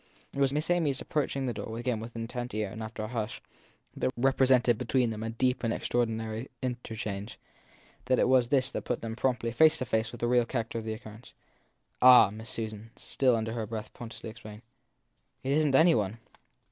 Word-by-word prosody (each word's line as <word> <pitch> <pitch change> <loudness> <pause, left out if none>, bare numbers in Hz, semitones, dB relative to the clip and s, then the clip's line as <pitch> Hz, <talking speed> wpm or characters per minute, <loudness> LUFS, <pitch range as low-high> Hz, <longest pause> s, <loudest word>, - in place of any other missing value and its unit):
It - - -5
was 135 -1 +3
Miss 150 +4 -1
Amy 175 -4 +2
s 135 - -2
approach 150 -2 -1
ing 135 -1 -1
the 125 - -1
door 110 +2 -6
again 120 -1 -1
as - - -7
with 115 +1 -9
intent 120 +1 -5
ear 105 -2 -2
and 110 - -7
after 110 0 -5
a - - -3
hush 110 -2 -4 0.6
that - - -2
had - - 0
represented 130 -2 +3
between 125 -1 +1
them 110 -1 -5
a 110 - -3
deep 125 +3 0
and 115 - +1
extraordinary 115 0 -2
in 125 -2 -2
terchange 105 -2 -5 0.7
it 130 - +4
was 130 -2 +4
this 135 +1 +1
that - - -3
put - - -3
them 115 -1 -4
promptly 125 -2 0
face 155 +6 +5
to 130 - -3
face 110 0 0
with, 120 - -10
the 120 - +1
real 120 -1 +3
character 115 -2 -3
of 110 - -8
the 110 - -2
occurrence. 110 0 -11 0.7
Ah, 125 -5 +8
Miss 110 +2 -9
Susan, 110 -1 -5
still 130 -3 +1
under 110 0 -2
her 115 -2 -3
breath, 110 -1 -6
portentously 115 -2 -8
exclaimed, 110 -1 -11 0.8
it 135 - -1
isn 150 0 +3
t 135 - +5
any 165 +3 +6
one 105 0 -1
115 Hz, 215 wpm, -29 LUFS, 110-130 Hz, 0.8 s, Ah